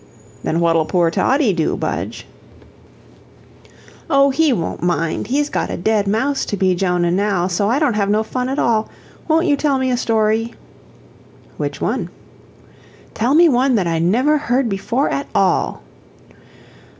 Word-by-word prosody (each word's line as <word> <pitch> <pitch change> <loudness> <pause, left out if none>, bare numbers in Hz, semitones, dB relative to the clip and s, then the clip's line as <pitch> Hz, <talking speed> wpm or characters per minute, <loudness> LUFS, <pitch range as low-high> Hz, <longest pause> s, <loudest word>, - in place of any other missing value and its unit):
"Then 165 - -1
what'll 165 -2 +2
poor 175 -3 +1
Toddie 260 - +2
do, 165 -3 -1
Budge?" - - -4 1.8
"Oh, 275 -2 +4
he 310 +2 +2
won't 175 -10 -3
mind 170 +1 -1
he's 285 +4 0
got - - -3
a - - -4
dead 205 +2 0
mouse 265 +7 0
to 205 - -3
be 185 -1 +2
Jonah 180 -1 0
now, 195 -1 0
so 190 +3 0
I 245 - +2
don't 290 -5 +1
have 200 -1 0
no 215 +1 +2
fun 250 +3 -3
at 270 - -3
all. 220 -4 +1 0.4
Won't 325 +2 +2
you 295 -4 +3
tell 280 -1 0
me 260 -1 0
a 245 - 0
story?" 225 0 0 1.0
"Which - - -4
one?" - - -2 1.0
"Tell 245 +6 +1
me 340 +2 +6
one 260 -2 +2
that 195 -5 +1
I 165 -1 -1
never 250 - +2
heard 255 -2 0
before 230 +7 -1
at 280 - -3
all." 190 -2 +1
220 Hz, 160 wpm, -18 LUFS, 185-270 Hz, 1.8 s, me